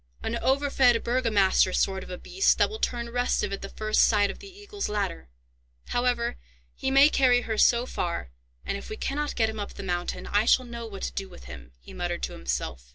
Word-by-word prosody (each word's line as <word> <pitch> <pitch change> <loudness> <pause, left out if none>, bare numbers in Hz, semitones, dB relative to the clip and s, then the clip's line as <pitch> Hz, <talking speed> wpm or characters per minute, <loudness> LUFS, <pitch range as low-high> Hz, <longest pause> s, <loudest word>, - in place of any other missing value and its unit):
An 230 - -2
overfed 265 -3 +3
burgomaster 215 -7 +2
sort 190 0 +1
of - - -12
a 180 - -5
beast, 385 - +1
that - - +2
will 435 - -6
turn 235 - -2
restive 245 -4 0
at 195 - -4
the 195 - -6
first 215 0 +1
sight 205 -2 +4
of - - -12
the 400 - -11
Eagle's 410 +1 -6
Ladder! 195 - -3 0.6
However, 245 -1 0 0.4
he - - -3
may 275 +2 +7
carry 255 -4 +4
her 225 -2 -3
so 235 +3 +4
far, 170 - -3 0.3
and, - - -2
if - - -11
we 430 - -6
cannot 295 -3 -2
get 225 -2 +2
him 220 -1 -5
up 205 - -6
the - - -7
mountain, 175 -2 -3
I 205 +2 +1
shall 255 +2 +4
know 235 -1 -7
what 200 -3 -8
to - - -3
do 195 -1 -5
with 175 - -13
him," 65 -1 -11
he - - -13
muttered 60 0 -3
to - - -2
himself. 60 -1 -4
225 Hz, 220 wpm, -27 LUFS, 190-255 Hz, 0.6 s, may